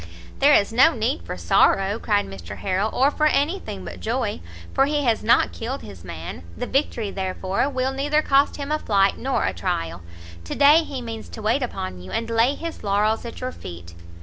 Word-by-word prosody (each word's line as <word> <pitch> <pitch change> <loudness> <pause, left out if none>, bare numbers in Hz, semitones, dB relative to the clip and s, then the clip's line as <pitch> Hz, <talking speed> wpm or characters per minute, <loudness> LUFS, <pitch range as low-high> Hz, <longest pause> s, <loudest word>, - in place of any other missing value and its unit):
"There 285 +2 +6
is 200 +2 +2
no 265 +7 +5
need 240 +7 -1
for - - -5
sorrow," 195 +3 +3
cried 205 -3 +1
Mr 95 -3 -9
Harrel, 195 +2 0
"or 275 +3 +3
for 305 +1 +2
any 305 +6 +1
thing 95 - -7
but 90 0 -8
joy, 85 -2 -2 0.3
for 270 - +3
he 295 0 0
has 230 -4 +1
not 230 - +4
killed 250 +4 -5
his 95 -4 -11
man; 85 -1 -7 0.2
the - - -3
victory, 240 -6 -1
therefore, 190 +5 -1
will 260 -1 -1
neither 295 +3 +1
cost 275 +1 +3
him 285 0 -5
a 305 - +1
flight 200 -5 +2
nor 270 +1 0
a 95 - 0
trial. 85 0 -3 0.4
To - - -4
day 295 +4 +6
he 270 -5 -6
means 225 -1 -7
to 220 - -9
wait 225 +6 +2
upon 95 - -4
you, 90 - -10
and 230 - -3
lay 230 +5 +3
his 335 -1 -7
laurels 210 +3 +1
at 235 - -8
your 255 0 -3
feet." 85 - -10
225 Hz, 205 wpm, -23 LUFS, 185-275 Hz, 0.4 s, There